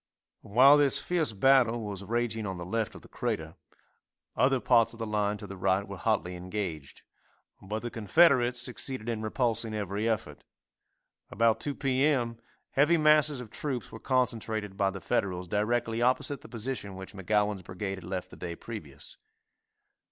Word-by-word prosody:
While 130 Hz, +7 st, +6 dB
this 145 Hz, -2 st, +3 dB
fierce 170 Hz, -7 st, 0 dB
battle 120 Hz, +1 st, +4 dB
was 100 Hz, -2 st, -5 dB
raging 115 Hz, 0 st, -1 dB
on 95 Hz, -1 st, -4 dB
the 85 Hz, -, -6 dB
left 110 Hz, +4 st, -2 dB
of -, -, -12 dB
the -, -, -14 dB
"Crater," 80 Hz, 0 st, -3 dB, 0.8 s
other 130 Hz, 0 st, +3 dB
parts 115 Hz, -1 st, +3 dB
of -, -, -12 dB
the 115 Hz, -, -3 dB
line 105 Hz, -1 st, 0 dB
to 105 Hz, -, -9 dB
the 100 Hz, 0 st, -8 dB
right 95 Hz, +1 st, +1 dB
were 100 Hz, -1 st, -7 dB
hotly 100 Hz, -5 st, 0 dB
engaged, 90 Hz, -5 st, -5 dB, 0.6 s
but 105 Hz, +4 st, -5 dB
the 120 Hz, -, -4 dB
Confederates 125 Hz, -, +4 dB
succeeded 125 Hz, 0 st, -2 dB
in 115 Hz, -2 st, -2 dB
repulsing 115 Hz, -1 st, -1 dB
every 105 Hz, +2 st, -1 dB
effort. 110 Hz, -2 st, -3 dB, 0.9 s
About 115 Hz, 0 st, +2 dB
2 145 Hz, -1 st, -3 dB
p. 135 Hz, -1 st, 0 dB
m., 120 Hz, -6 st, +1 dB, 0.3 s
heavy 150 Hz, +5 st, +4 dB
masses 150 Hz, -3 st, +4 dB
of 115 Hz, -4 st, -10 dB
troops 130 Hz, -6 st, -4 dB
were 115 Hz, -, -9 dB
concentrated 110 Hz, -6 st, -1 dB
by 100 Hz, -1 st, +2 dB
the 95 Hz, 0 st, -6 dB
Federals 90 Hz, -1 st, -1 dB
directly 115 Hz, +4 st, 0 dB
opposite 130 Hz, +3 st, +1 dB
the -, -, -13 dB
position 115 Hz, -4 st, -5 dB
which 95 Hz, 0 st, -9 dB
McGowan's 105 Hz, +1 st, 0 dB
brigade 95 Hz, +2 st, -5 dB
had -, -, -14 dB
left 90 Hz, +1 st, -5 dB
the -, -, -12 dB
day 85 Hz, -2 st, -5 dB
previous. 85 Hz, -, -9 dB
110 Hz, 165 wpm, -29 LUFS, 100-125 Hz, 0.9 s, While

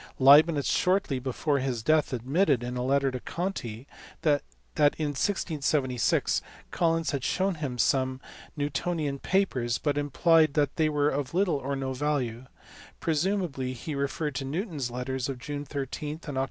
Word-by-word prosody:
Leibnitz 145 Hz, +2 st, +6 dB
shortly 180 Hz, -8 st, +1 dB
before 135 Hz, +3 st, -1 dB
his 130 Hz, -4 st, -2 dB
death 155 Hz, +1 st, +3 dB
admitted 130 Hz, -, +1 dB
in 125 Hz, +1 st, -4 dB
a 125 Hz, -, -2 dB
letter 135 Hz, +1 st, +2 dB
to 130 Hz, -, -4 dB
Conti 130 Hz, -, -4 dB, 0.4 s
that 145 Hz, -2 st, +3 dB, 0.6 s
in 155 Hz, -2 st, -1 dB
1676 145 Hz, -, 0 dB, 0.3 s
Collins 165 Hz, -2 st, +1 dB
had 140 Hz, -3 st, -3 dB
shewn 190 Hz, +5 st, +1 dB
him 145 Hz, -6 st, -4 dB
some 130 Hz, +1 st, +1 dB, 0.4 s
Newtonian 145 Hz, 0 st, -2 dB
papers, 130 Hz, -13 st, 0 dB
but 145 Hz, -1 st, 0 dB
implied 155 Hz, +1 st, +3 dB
that 145 Hz, -3 st, +1 dB
they 155 Hz, -1 st, +3 dB
were 145 Hz, -1 st, +2 dB
of 145 Hz, +2 st, -3 dB
little 185 Hz, -5 st, +2 dB
or 140 Hz, +1 st, -3 dB
no 135 Hz, -1 st, -3 dB
value 130 Hz, -3 st, -2 dB, 0.5 s
presumably 160 Hz, -5 st, -1 dB
he 140 Hz, +5 st, -6 dB
referred 140 Hz, +2 st, -2 dB
to 135 Hz, -, -3 dB
Newton 165 Hz, +5 st, -3 dB
s 130 Hz, -3 st, -2 dB
letters 125 Hz, +2 st, -3 dB
of 135 Hz, -, -4 dB
June 145 Hz, +3 st, -5 dB
13 145 Hz, +2 st, -4 dB
and 145 Hz, -4 st, -5 dB
Oct. -, -, +2 dB
145 Hz, 155 wpm, -28 LUFS, 130-155 Hz, 0.6 s, Leibnitz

